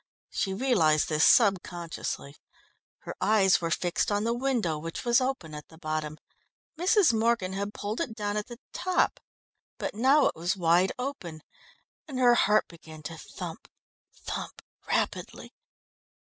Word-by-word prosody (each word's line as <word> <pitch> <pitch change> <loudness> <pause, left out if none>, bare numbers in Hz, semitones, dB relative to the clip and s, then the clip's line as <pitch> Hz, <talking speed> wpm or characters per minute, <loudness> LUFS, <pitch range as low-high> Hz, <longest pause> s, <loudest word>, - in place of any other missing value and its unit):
She 195 - -1
realised 190 - +2
this 155 -1 +2
subconsciously. 175 - +1 0.7
Her - - -7
eyes 195 -4 +4
were 165 - -1
fixed 175 +4 0
on 205 0 +1
the 230 +1 +1
window, 240 - -1
which 165 +7 -6
was 240 +1 +4
open 255 - -3
at 150 0 -8
the 160 - -17
bottom. 155 -2 -3 0.6
Mrs. 360 - +4
Morgan 225 -4 +1
had 200 +1 -3
pulled 210 +7 -3
it 245 -9 -3
down 205 -1 -2
at 210 0 -2
the 240 -1 -9 0.2
top, 365 +1 +1 0.6
but - - -4
now 265 +7 +4
it - - +1
was 175 +4 -1
wide 175 +2 +3
open, 220 - -6 0.6
and 275 -4 -6
her 245 -1 +5
heart 210 -3 +3
began 160 -2 -13
to 165 +3 -6
thump, - - -8 0.5
thump, - - -6 0.2
rapidly. - - -2
200 Hz, 150 wpm, -28 LUFS, 165-240 Hz, 0.7 s, her